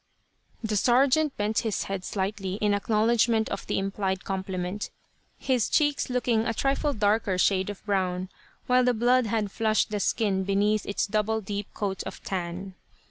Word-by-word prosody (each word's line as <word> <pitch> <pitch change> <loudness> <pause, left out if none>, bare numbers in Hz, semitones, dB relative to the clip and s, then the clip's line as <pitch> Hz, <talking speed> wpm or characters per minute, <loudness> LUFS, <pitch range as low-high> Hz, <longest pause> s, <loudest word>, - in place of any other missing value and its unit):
The 215 -1 0
sergeant 270 +6 +3
bent 210 +1 +1
his 220 -3 -1
head 195 -2 -4
slightly, 195 -1 -3
in 210 0 +1
acknowledgement 220 +2 +2
of 200 - -5
the - - -1
implied 195 -1 -2
compliment, 190 0 -3 0.5
his 255 -6 0
cheeks 290 -4 +2
looking 245 -3 +1
a 230 - -1
trifle 275 +3 0
darker 210 -3 +1
shade 190 +1 +2
of 205 0 -8
brown, 185 -2 -1 0.4
where 250 0 +4
the 250 -1 +2
blood 245 +1 +3
had 215 -2 -1
flushed 220 0 +1
the 210 - -1
skin 200 -2 +1
beneath 200 +2 +1
its 200 - 0
double 215 +1 0
deep 205 -1 -5
coat 195 -2 -2
of - - -9
tan. 185 +1 -4
210 Hz, 160 wpm, -27 LUFS, 195-230 Hz, 0.5 s, where